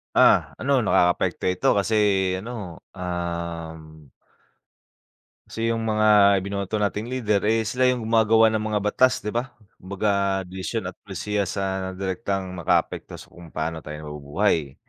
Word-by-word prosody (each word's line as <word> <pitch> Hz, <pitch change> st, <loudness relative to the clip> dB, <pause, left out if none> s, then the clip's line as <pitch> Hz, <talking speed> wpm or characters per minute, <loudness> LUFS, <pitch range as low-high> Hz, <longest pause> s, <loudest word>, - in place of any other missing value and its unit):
Ah, -, -, +4 dB
ano 140 Hz, 0 st, +1 dB
nakaka-apekto 90 Hz, -5 st, +1 dB
ito, 90 Hz, -, -1 dB
kasi 100 Hz, +2 st, 0 dB, 0.5 s
ano, 105 Hz, -6 st, -7 dB, 0.2 s
um 85 Hz, -3 st, -5 dB, 1.4 s
Kasi 115 Hz, +1 st, -2 dB
'yung 115 Hz, -, -1 dB
mga 105 Hz, -2 st, +5 dB
ibinoto 100 Hz, +1 st, -3 dB
nating 105 Hz, +1 st, -1 dB
leader, 115 Hz, -5 st, 0 dB
eh, 115 Hz, +1 st, +2 dB
sila 125 Hz, +4 st, +1 dB
'yung 125 Hz, -2 st, 0 dB
gumagawa 110 Hz, 0 st, +4 dB
ng 110 Hz, -, 0 dB
mga 105 Hz, -1 st, 0 dB
batas 125 Hz, +5 st, +2 dB
'di 105 Hz, -, -3 dB
ba. 120 Hz, +3 st, -3 dB, 0.2 s
Kumbaga 100 Hz, 0 st, 0 dB
desisyon 95 Hz, +2 st, -4 dB
at -, -, -23 dB
pulisiya 100 Hz, 0 st, -3 dB
sa 95 Hz, -1 st, -3 dB
direktang 95 Hz, 0 st, -3 dB
maka-apekto 90 Hz, -3 st, -1 dB
sa -, -, -13 dB
kung 85 Hz, -1 st, -13 dB
paano 80 Hz, +1 st, -4 dB
tayo 75 Hz, -1 st, -8 dB
nabubuhay. 75 Hz, 0 st, -1 dB
100 Hz, 135 wpm, -24 LUFS, 90-110 Hz, 1.4 s, mga